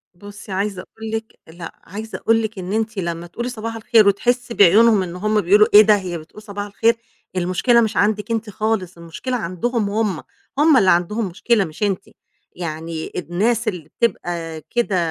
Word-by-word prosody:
بُصي، 205 Hz, +2 st, -11 dB
عايزة 195 Hz, 0 st, -2 dB
أقول 220 Hz, +3 st, -9 dB
لِك 225 Hz, 0 st, -5 dB
لأ 165 Hz, +1 st, -10 dB
عايزة 215 Hz, +4 st, -7 dB
أقول 225 Hz, 0 st, +2 dB
لِك 220 Hz, -2 st, -4 dB
إن 185 Hz, +2 st, -5 dB
أنتِ 220 Hz, 0 st, -2 dB
لمّا 170 Hz, -2 st, -3 dB
تقولي 235 Hz, +8 st, -5 dB
لي -, -, -2 dB
صباح 225 Hz, 0 st, -5 dB
الخير، 225 Hz, -1 st, +4 dB
وتحسّي 245 Hz, +4 st, +1 dB
بعيونهم 210 Hz, +1 st, +5 dB
إن 175 Hz, -1 st, -7 dB
هُم 210 Hz, +3 st, +1 dB
بيقولوا 205 Hz, +4 st, +5 dB
إيه 210 Hz, -, +11 dB
ده، 215 Hz, 0 st, +5 dB
هي 185 Hz, -4 st, -4 dB
بتقول 160 Hz, +6 st, -13 dB
صباح 205 Hz, -1 st, -6 dB
الخير؟! 225 Hz, +3 st, +2 dB, 0.4 s
المشكلة 185 Hz, +7 st, +2 dB
مش 220 Hz, -1 st, -1 dB
عندِك 210 Hz, +1 st, +1 dB
أنتِ 225 Hz, -1 st, -2 dB
خالص، 205 Hz, -4 st, -2 dB
المشكلة 170 Hz, +10 st, -4 dB
عندهم 210 Hz, +4 st, -2 dB
هُم، 205 Hz, -5 st, -1 dB, 0.3 s
هُم 300 Hz, -1 st, +5 dB
اللي 195 Hz, -6 st, +4 dB
عندهم 195 Hz, +6 st, +1 dB
مشكلة، 205 Hz, +4 st, +1 dB
مش 160 Hz, +5 st, -7 dB
أنتِ، 195 Hz, -3 st, -1 dB, 0.5 s
يعني 160 Hz, -1 st, -5 dB
الناس 210 Hz, +7 st, -1 dB
اللي 175 Hz, -7 st, -4 dB
بتبقى 170 Hz, -8 st, -2 dB
كده 235 Hz, -5 st, 0 dB
205 Hz, 180 wpm, -20 LUFS, 180-225 Hz, 0.5 s, إيه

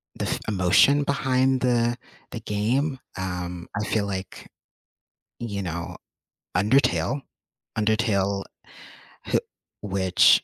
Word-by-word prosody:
the -, -, -2 dB
f -, -, -1 dB
emotion 105 Hz, +9 st, +4 dB
behind 130 Hz, -2 st, +2 dB
the 120 Hz, -1 st, +2 dB, 0.4 s
the -, -, -4 dB
game. 130 Hz, +7 st, 0 dB, 0.2 s
Um, 90 Hz, -2 st, -4 dB
I 105 Hz, -, -1 dB
feel 105 Hz, -2 st, +1 dB
like, 95 Hz, -1 st, -5 dB, 0.9 s
you 100 Hz, -4 st, -3 dB
know, 85 Hz, -2 st, -4 dB, 0.6 s
Undertale 125 Hz, +6 st, +3 dB, 0.6 s
Undertale, 105 Hz, -3 st, +1 dB, 0.8 s
h -, -, +3 dB, 0.4 s
which 95 Hz, -2 st, +4 dB
105 Hz, 100 wpm, -25 LUFS, 95-125 Hz, 0.9 s, emotion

